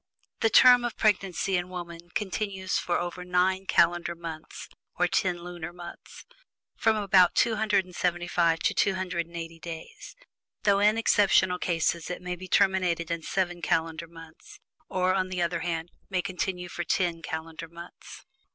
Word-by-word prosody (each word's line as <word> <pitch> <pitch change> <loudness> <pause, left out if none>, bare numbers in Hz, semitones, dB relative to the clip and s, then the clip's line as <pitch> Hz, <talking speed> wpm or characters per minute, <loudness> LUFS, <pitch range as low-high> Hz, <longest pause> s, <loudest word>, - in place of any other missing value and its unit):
The 225 - +3
term 245 +2 +7
of 240 -2 -3
pregnancy 195 -4 +1
in 175 0 -3
woman 175 -1 -8
continues 195 -2 -2
for 175 - 0
over 175 +1 -4
nine 185 +1 +1
calendar 170 0 +2
months 165 -2 -8 0.3
(or - - +3
ten 180 -4 0
lunar 175 -1 -7
months) 175 0 -11 0.5
from 220 -1 +2
about 195 -4 +4
275 180 -6 +1
to - - +1
280 170 -3 -2
days, 165 - -9 0.5
though 200 -1 +4
in 210 +2 +4
exceptional 195 -4 +3
cases 170 -1 0
it 180 0 -5
may 180 0 -3
be 185 +1 -10
terminated 185 -4 +2
in 170 -1 -2
seven 175 0 -2
calendar 165 0 -1
months, 165 - -14 0.3
or 185 0 +1
on 185 -1 0
the 185 -1 -3
other 170 0 0
hand 165 0 -3 0.2
may 185 -2 0
continue 180 -1 -3
for 175 - -4
ten 170 -1 0
calendar 160 0 -6
months. 170 +1 -12
180 Hz, 145 wpm, -27 LUFS, 170-190 Hz, 0.5 s, term